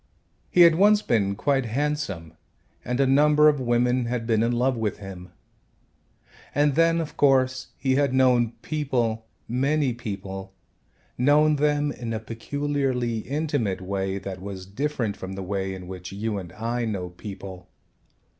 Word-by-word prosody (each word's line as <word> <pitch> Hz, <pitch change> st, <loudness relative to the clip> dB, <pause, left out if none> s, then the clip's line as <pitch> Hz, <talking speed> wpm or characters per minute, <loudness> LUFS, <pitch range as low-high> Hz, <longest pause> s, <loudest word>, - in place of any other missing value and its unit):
He 180 Hz, -, +4 dB
had 170 Hz, -1 st, +8 dB
once 205 Hz, +5 st, +4 dB
been 100 Hz, -4 st, +1 dB
quite 135 Hz, +3 st, +1 dB
handsome 115 Hz, -, -2 dB, 0.5 s
and 125 Hz, +2 st, -2 dB
a 135 Hz, -, +4 dB
number 150 Hz, +3 st, +5 dB
of 145 Hz, -2 st, +4 dB
women 125 Hz, 0 st, +1 dB
had 120 Hz, -1 st, -2 dB
been 110 Hz, -2 st, +2 dB
in 115 Hz, +1 st, +2 dB
love 125 Hz, +2 st, +1 dB
with 110 Hz, -3 st, -2 dB
him. 95 Hz, -3 st, -9 dB, 1.3 s
And 145 Hz, 0 st, +3 dB
then, 165 Hz, +2 st, +3 dB
of 160 Hz, -2 st, -4 dB
course, 130 Hz, -2 st, +2 dB
he 130 Hz, -1 st, +1 dB
had 140 Hz, -2 st, +2 dB
known 125 Hz, -3 st, +3 dB
people, 120 Hz, -7 st, -1 dB, 0.2 s
many 135 Hz, +2 st, +1 dB
people, 95 Hz, -4 st, -7 dB, 0.6 s
known 150 Hz, +3 st, +4 dB
them 145 Hz, 0 st, +1 dB
in 120 Hz, -4 st, -5 dB
a 110 Hz, -, -2 dB
peculiarly 125 Hz, 0 st, -2 dB
intimate 140 Hz, -6 st, -1 dB
way 95 Hz, +1 st, -2 dB
that 95 Hz, -1 st, -6 dB
was 95 Hz, -1 st, -7 dB
different 120 Hz, 0 st, -2 dB
from 95 Hz, 0 st, -6 dB
the 95 Hz, 0 st, -5 dB
way 95 Hz, 0 st, -2 dB
in 90 Hz, -1 st, -9 dB
which 90 Hz, 0 st, -8 dB
you 105 Hz, +1 st, -3 dB
and 90 Hz, -3 st, -9 dB
I 115 Hz, +4 st, -2 dB
know 100 Hz, -6 st, -3 dB
people. 95 Hz, -1 st, -9 dB
120 Hz, 155 wpm, -25 LUFS, 100-145 Hz, 1.3 s, had